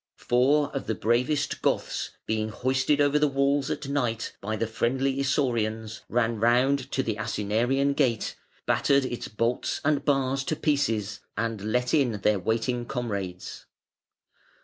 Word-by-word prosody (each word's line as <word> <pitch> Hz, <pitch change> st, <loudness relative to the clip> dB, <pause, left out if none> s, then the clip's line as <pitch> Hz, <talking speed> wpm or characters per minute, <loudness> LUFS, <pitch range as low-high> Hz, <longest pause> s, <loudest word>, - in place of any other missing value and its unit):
Four 140 Hz, +4 st, +2 dB
of 135 Hz, -, -3 dB
the 110 Hz, -, 0 dB
bravest 125 Hz, -, 0 dB
Goths -, -, -1 dB, 0.2 s
being 110 Hz, 0 st, -1 dB
hoisted 130 Hz, +5 st, +1 dB
over 145 Hz, +1 st, +3 dB
the 150 Hz, -, +4 dB
walls 140 Hz, 0 st, +1 dB
at 140 Hz, -, -3 dB
night 120 Hz, -5 st, -1 dB
by 110 Hz, +2 st, -2 dB
the 115 Hz, -, -1 dB
friendly 130 Hz, +4 st, 0 dB
Isaurians, 115 Hz, -5 st, -1 dB
ran 115 Hz, -1 st, +1 dB
round 125 Hz, +5 st, +3 dB
to 135 Hz, -, +1 dB
the 110 Hz, -3 st, -2 dB
Asinarian 120 Hz, +7 st, +1 dB
Gate, 125 Hz, -6 st, 0 dB, 0.3 s
battered 140 Hz, -1 st, +3 dB
its 120 Hz, -2 st, -4 dB
bolts 115 Hz, +3 st, -1 dB
and 145 Hz, -2 st, +2 dB
bars 135 Hz, -2 st, +1 dB
to 155 Hz, -, -1 dB
pieces, 115 Hz, -10 st, 0 dB, 0.2 s
and 115 Hz, -3 st, -2 dB
let 125 Hz, +1 st, 0 dB
in 135 Hz, -7 st, +3 dB
their 105 Hz, 0 st, +2 dB
waiting 115 Hz, +5 st, -1 dB
comrades. 100 Hz, -8 st, -5 dB
125 Hz, 145 wpm, -27 LUFS, 110-140 Hz, 0.3 s, the